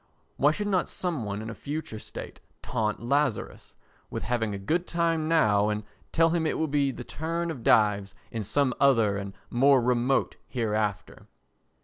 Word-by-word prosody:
Why 145 - +5
should 205 +7 -1
not 190 -4 +1
some 165 - -2
one 100 +1 -4
in 110 - -6
a - - -6
future 145 -4 -5
state - - -9 0.2
taunt 105 0 -2
Lazarus 140 -2 -1 0.3
with - - -4
having 115 -3 0
a 100 - -3
good 165 - -1
time 165 -2 0
now 105 -11 +3
and 105 0 -2 0.3
tell 165 0 +4
him 165 -2 +1
it - - -1
will 160 - 0
be 140 -1 +1
the 125 - -6
turn 165 +5 -3
of 135 -7 -7
Dives 100 -2 +3 0.2
in 115 -2 -3
some 130 +5 +1
other 115 -7 +4
and 100 -1 -6 0.2
more 135 +2 +5
remote 125 +2 +1
hereafter? 105 -4 -2
125 Hz, 170 wpm, -27 LUFS, 105-160 Hz, 0.3 s, Why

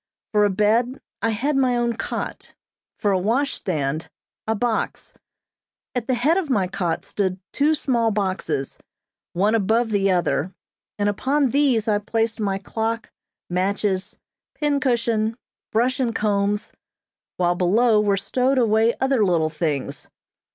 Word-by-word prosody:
For 210 -1 +4
a - - +3
bed 225 +6 +1 0.2
I 230 - +1
had 260 +7 0
my 260 -2 +3
own 235 0 +1
cot; - - -5 0.4
for 205 - +1
a 190 - +2
washstand, 180 - -1 0.4
a 220 - +1
box. 225 +1 -2 0.8
At 245 -2 -3
the 260 - +2
head 290 +9 +2
of 360 -6 -1
my 205 -8 +2
cot 175 -3 -2
stood 190 -2 -2
two 300 +2 +3
small 240 -6 +1
boxes, 185 -9 -2 0.5
one 200 +5 +2
above 225 +2 +2
the 195 -1 +2
other, 175 -1 0 0.4
and 205 0 +1
upon 270 +7 +1
these 260 -6 +2
I 210 -1 +2
placed 225 +2 -1
my 200 -2 0
clock, 225 +3 -3 0.4
matches, 190 +1 -1 0.4
pincushion, 235 -6 0 0.3
brush 245 +4 +1
and 235 -3 0
combs, 205 0 0 0.7
while 175 -1 +2
below 210 +5 +3
were 200 -1 +2
stowed 255 +7 +1
away 225 -1 +3
other 265 -4 +2
little 165 -5 +2
things. 150 -4 -3
215 Hz, 135 wpm, -23 LUFS, 195-245 Hz, 0.8 s, For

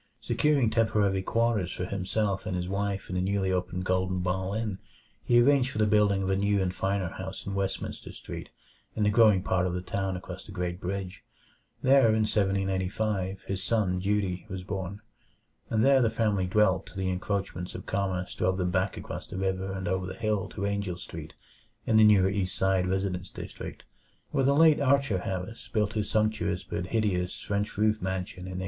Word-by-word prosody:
Securing 140 -7 +2
temporary 105 -4 +2
quarters 115 -3 +1
for 90 - -3
himself 100 +1 -1
and 90 - -1
his 90 0 -2
wife 100 0 -2
at - - -6
the 90 - +1
newly 95 0 0
opened 90 0 -2
Golden 95 0 +1
Ball 95 +2 -1
Inn, 110 -3 -2 0.4
he 120 0 +4
arranged 130 +1 +4
for 105 - -6
the 110 - +3
building 105 -2 +3
of 95 - -1
a - - +3
new 100 +1 +2
and 90 -1 0
finer 95 -1 -1
house 95 +2 -7
in 100 - -4
Westminster 100 -1 -3
Street, - - -8 0.5
in 110 - 0
the 105 - +3
growing 105 -4 +5
part 95 0 +1
of 90 - -2
the 90 - -2
town 95 0 -2
across 90 +1 -8
the - - -12
Great 90 -1 -3
Bridge. 95 0 -4 0.6
There, 135 -2 +6
in 110 0 +3
1785, 95 -1 0
his 95 -1 -3
son 100 -4 +1
Dutee 95 -1 -1
was 95 -1 -5
born; 100 +1 -5 0.7
and 110 +1 +2
there 135 -1 +6
the 115 - +3
family 105 -4 +1
dwelt 100 0 +2
till - - -13
the 95 -1 -1
encroachments 95 -1 -3
of - - -7
commerce 95 -2 -2
drove 95 0 0
them 90 -1 0
back 95 +1 0
across - - -6
the - - -7
river 95 0 -1
and 95 -1 -4
over 95 0 -1
the 95 - -6
hill 110 -4 -1
to 100 - -4
Angell 100 -3 -2
Street, 80 -3 -9 0.5
in 110 - +3
the 110 - +7
newer 105 -3 +6
East 95 -2 -1
Side 95 -1 +2
residence 95 -1 -1
district, - - -8 0.5
where - - +1
the 140 +1 +4
late 160 0 +6
Archer 140 -7 +3
Harris 95 +4 -5
built 105 -1 +1
his 105 -1 -1
sumptuous 110 -4 0
but 90 +1 -4
hideous 95 -5 0
French 100 0 -2
roofed 110 +1 +2
mansion 95 0 -3
in 95 -1 -5
1876. - - -3
95 Hz, 195 wpm, -28 LUFS, 95-105 Hz, 0.7 s, the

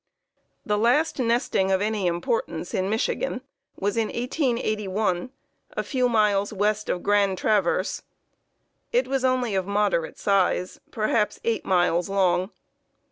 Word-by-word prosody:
"The 210 -1 0
last 270 +8 +2
nesting 230 -5 +1
of 190 - +3
any 205 -2 0
importance 465 - -2
in 190 +1 0
Michigan 225 - -1 0.3
was 205 +2 -2
in 225 -1 +1
1881, 215 - -1 0.4
a - - -2
few 255 -3 0
miles 210 -3 +2
west 210 +1 0
of 180 - -1
Grand 200 -2 +2
Traverse. 205 -2 +1 0.9
It - - +2
was 270 -1 -1
only 255 -4 +1
of 190 -1 -1
moderate 200 -5 0
size, 190 -2 +1
perhaps 215 -1 0
8 230 -1 -1
miles 175 -1 +2
long. 185 -1 +2
210 Hz, 130 wpm, -25 LUFS, 190-235 Hz, 0.9 s, of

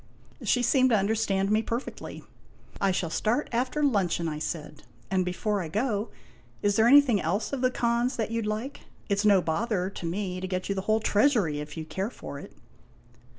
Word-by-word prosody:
She 245 - +2
seemed 260 +1 +4
to 225 - +4
understand 200 -1 +1
me 215 +1 +3
perfectly. 230 +3 -5 0.3
" - - -20
I 195 - +3
shall 180 -3 -1
start 235 - 0
after 255 +5 0
luncheon," 190 - +1
I 150 -1 -3
said. 150 -1 -5 0.3
"And, 190 -1 +2
before 195 +3 -1
I 170 - -4
go, 215 +4 -1 0.5
is 205 -1 +2
there 220 - +4
Il8 - - +5
IMAGINOTIONS - - +5
anything 265 -8 +6
else 195 - -1
of 270 - -2
the 255 - +3
Khan's 235 0 0
that 225 -1 -2
you 230 0 0
'd 210 - -3
like? 220 +7 -3 0.3
It 200 -1 +1
's 210 - 0
no 200 -3 +5
bother 190 +2 -1
to 180 - -7
me 185 +1 -3
to 185 - -3
get 185 0 -3
you - - +2
the 190 - -2
whole 220 +1 +3
treasury 205 - +2
if 150 0 -7
you 160 - -3
'd 155 - -16
care 195 +2 -2
for 140 - -8
it." - - -11
205 Hz, 220 wpm, -27 LUFS, 185-235 Hz, 0.5 s, anything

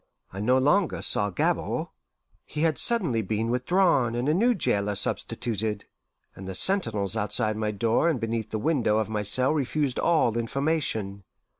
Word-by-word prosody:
I 95 - -6
no 125 +5 +2
longer 150 +7 +1
saw 100 - +2
Gabord; 90 - -1 0.5
he 150 - -6
had 160 -4 +1
suddenly 175 - +2
been 110 +3 -2
with 125 +2 -2
drawn 170 -11 +2
and 120 +3 -2
a 150 - +3
new 235 +8 +2
jailer 105 - 0
substituted, 105 +1 -2 0.5
and 95 - -9
the 95 - -5
sentinels 110 - +1
outside 110 0 0
my 110 0 -2
door 115 +9 +1
and 150 -7 -1
beneath 115 -1 -3
the 110 - -3
window 115 -3 +1
of 110 -1 -1
my 105 -1 -2
cell 125 +7 +2
refused 145 -2 -1
all 155 -9 +2
information. 115 -6 -2
115 Hz, 165 wpm, -26 LUFS, 105-150 Hz, 0.5 s, a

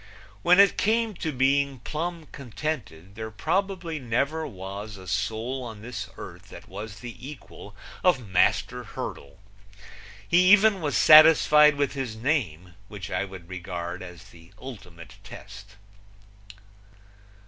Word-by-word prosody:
When 180 - +5
it 200 0 +5
came 225 +1 +1
to 160 - -3
being 140 +1 +1
plumb 160 +6 -5
contented 115 - -6
there 110 +1 -6
probably 175 - -2
never 140 +6 -1
was 100 +2 -8
a 95 -1 -12
soul 110 +7 -2
on 110 -3 -9
this 115 -3 -6
earth - - -11
that - - -12
was 105 -1 -8
the 120 -1 -8
equal 130 -7 -11 0.3
of 135 - +2
Master 90 -1 +1
Hurdle. 70 0 -8 0.9
He 180 +2 +5
even 205 -2 +5
was 145 -2 0
satisfied 155 -1 +7
with 140 -1 -1
his 130 -6 -4
name 105 - -2
which 100 -1 -8
I 95 - -1
would 95 -3 -11
regard 90 -1 -6
as 90 -3 -10
the 85 +1 -17
ultimate 90 - -11
test. 105 +1 -12
120 Hz, 130 wpm, -26 LUFS, 95-155 Hz, 0.9 s, satisfied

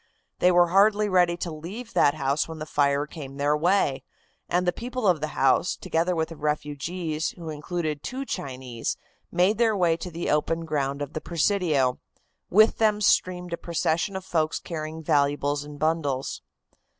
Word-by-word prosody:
They 180 - +5
were 175 -1 +5
hardly 205 +3 +4
ready 180 -3 +3
to 175 -1 -4
leave 200 +10 -8
that 145 - +4
house 140 0 0
when 160 -1 -7
the 155 - -5
fire 145 -1 +1
came 140 -3 -9
their 145 +1 +2
way, 160 -3 +2 0.5
and 180 +1 +1
the 180 - +2
people 250 0 -4
of 175 -5 +3
the 155 - -1
house, 135 +6 +3
together 170 +2 0
with 160 -1 -1
the 165 - -8
refugees, 150 +2 -2
who 165 -2 -6
included 155 0 -3
two 265 +2 -5
Chinese, 130 - -4 0.3
made 185 +5 +2
their 225 -3 +3
way 170 -3 +3
to 180 - -6
the 170 0 -3
open 165 +2 0
ground 140 -2 -1
of 145 +1 -8
the 155 - -4
Presidio. 160 -7 +1 0.5
With 215 +4 +5
them 215 -2 +3
streamed 180 -3 +1
a - - -1
procession 170 +2 -1
of 190 0 -5
folks 160 -3 0
carrying 160 -1 -6
valuables 145 0 +1
in 145 0 -10
bundles. 145 -4 -1
160 Hz, 175 wpm, -26 LUFS, 145-180 Hz, 0.5 s, They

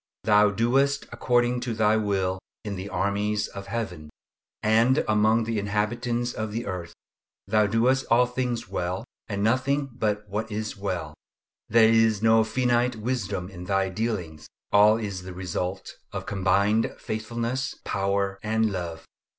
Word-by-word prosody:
Thou 105 0 +5
doest 135 +7 +1
according 120 0 +1
to 120 -2 -3
Thy 110 0 +3
will 95 -3 0 0.2
in 105 -2 -4
the 95 +2 -6
armies 105 +1 0
of 100 0 -9
Heaven, 90 -10 -4 0.5
and 115 +5 +3
among 110 +2 +3
the 110 -1 -1
inhabitants 120 +4 -1
of 110 -1 -4
the 115 +3 -3
earth! 90 -3 -5 0.5
Thou 105 +1 +3
doest 125 +5 +2
all 120 +2 +5
things 125 -1 -2
well, 90 +5 -3 0.2
and 100 -2 -2
nothing 130 +4 +1
but 105 -2 -1
what 105 +3 -3
is 105 0 -3
well. 90 -6 -4 0.6
There 115 0 +6
is 110 -2 +3
no 110 0 +5
finite 120 +1 +1
wisdom 110 -5 -2
in 90 -2 -9
Thy 95 +1 +1
dealings. 95 -7 -3 0.2
All 105 +2 +6
is 100 -5 -4
the 90 0 -8
result 90 +1 -4 0.2
of - - -5
combined 100 +3 +1
faithfulness, 115 +4 -3
power, 100 0 -1
and 110 0 +1
love. 85 -3 -5
110 Hz, 145 wpm, -26 LUFS, 100-115 Hz, 0.6 s, There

